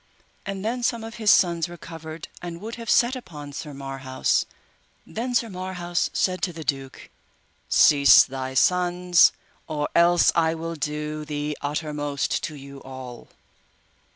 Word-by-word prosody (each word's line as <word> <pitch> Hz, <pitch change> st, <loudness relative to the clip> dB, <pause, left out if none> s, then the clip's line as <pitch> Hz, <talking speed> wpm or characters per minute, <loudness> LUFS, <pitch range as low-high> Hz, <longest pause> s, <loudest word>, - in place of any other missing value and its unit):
And 195 Hz, 0 st, -4 dB
then 245 Hz, +3 st, -1 dB
some 235 Hz, -1 st, 0 dB
of 225 Hz, -1 st, -8 dB
his 215 Hz, -, +3 dB
sons 170 Hz, -3 st, +4 dB
recovered, 165 Hz, -2 st, -9 dB
and 170 Hz, -1 st, -6 dB
would 220 Hz, +4 st, -7 dB
have 230 Hz, -2 st, -7 dB
set 245 Hz, +2 st, +4 dB
upon 150 Hz, -, -9 dB
Sir 150 Hz, +1 st, -6 dB
Marhaus; 135 Hz, -1 st, -1 dB, 0.6 s
then 245 Hz, +3 st, -4 dB
Sir 235 Hz, -, +2 dB
Marhaus 180 Hz, -3 st, -3 dB
said 185 Hz, -1 st, 0 dB
to 180 Hz, -, 0 dB
the 165 Hz, -1 st, -8 dB
duke, 135 Hz, -3 st, -4 dB, 0.6 s
Cease 140 Hz, -5 st, +7 dB
thy 130 Hz, 0 st, -6 dB
sons, 180 Hz, +2 st, +4 dB, 0.4 s
or 150 Hz, -2 st, -2 dB
else 170 Hz, 0 st, +5 dB
I 160 Hz, -1 st, +2 dB
will 165 Hz, +1 st, -5 dB
do 150 Hz, 0 st, -4 dB
the 150 Hz, 0 st, -3 dB
uttermost 145 Hz, -1 st, -2 dB
to 155 Hz, -, -7 dB
you 140 Hz, -1 st, -11 dB
all. 130 Hz, -2 st, -9 dB
160 Hz, 145 wpm, -24 LUFS, 145-180 Hz, 0.6 s, Cease